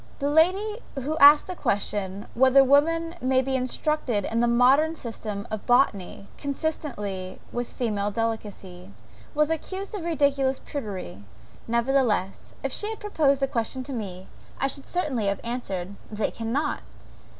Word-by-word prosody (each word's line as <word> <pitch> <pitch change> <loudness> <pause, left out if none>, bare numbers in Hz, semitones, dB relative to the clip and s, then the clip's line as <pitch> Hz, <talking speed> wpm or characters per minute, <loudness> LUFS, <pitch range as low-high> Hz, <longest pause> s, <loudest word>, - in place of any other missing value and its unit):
"The 285 0 -1
lady 385 +8 +3 0.2
who 280 +3 -2
asked 290 0 +9
the 365 - -5
question 200 - -2
whether 265 +2 +6
women 330 +5 +3
may 260 0 +2
be 265 0 -1
instructed 255 -4 -1
in 230 - -1
the 240 - +3
modern 265 +7 +4
system 215 -6 -6
of 215 -2 -5
botany, 205 -6 +2
consistently 240 -11 -4
with 240 0 -3
female 210 -4 -1
delicacy?" 205 -4 -4 0.5
was 300 +1 +2
accused 380 +5 -4
of 405 -5 -4
ridiculous 280 -5 +1
prudery: 190 - -6 0.4
nevertheless, 235 -5 0
if 270 -1 -2
she 420 - +1
had 445 - -5
proposed 285 -9 +1
the - - +3
question 255 +1 -2
to 270 - -6
me, 190 -6 -5 0.3
I - - +1
should 275 0 -3
certainly 275 - -1
have 200 0 0
answered 200 -6 -4 0.2
They 215 0 -1
cannot." 255 +7 -2
260 Hz, 145 wpm, -26 LUFS, 210-295 Hz, 0.5 s, asked